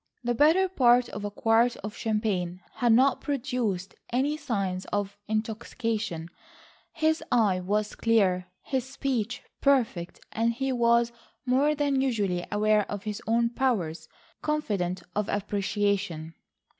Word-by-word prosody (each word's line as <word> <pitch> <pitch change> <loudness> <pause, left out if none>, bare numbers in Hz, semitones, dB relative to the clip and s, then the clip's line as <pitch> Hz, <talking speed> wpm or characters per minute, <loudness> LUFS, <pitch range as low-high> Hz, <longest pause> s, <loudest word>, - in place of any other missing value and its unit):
The 240 0 +1
better 320 +9 +4
part 250 -8 +4
of 205 - -6
a 205 - -2
quart 225 +3 +3
of 210 0 -5
champagne 205 -5 -1
had 240 -2 +2
not 260 +4 +4
produced 245 - -2 0.2
any 270 +5 +1
signs 195 -11 -2
of 205 -1 -2
intoxication; 220 -4 -2 0.6
his 315 0 +1
eye 205 -6 +3
was 210 +3 -1
clear, 190 -6 +2 0.2
his 265 -3 -1
speech 250 -2 -2 0.2
perfect, 235 -11 +1
and 230 +1 +1
he 270 +3 -1
was 235 -1 +3 0.3
more 275 +4 +3
than 285 -2 +1
usually 205 -9 0
aware 210 0 +2
of 205 -1 -4
his 210 -1 -4
own 235 +1 +2
powers, 175 -12 -1 0.3
confident 195 - -1
of 210 -1 -1
appreciation. 200 -5 -1
225 Hz, 130 wpm, -27 LUFS, 200-255 Hz, 0.6 s, better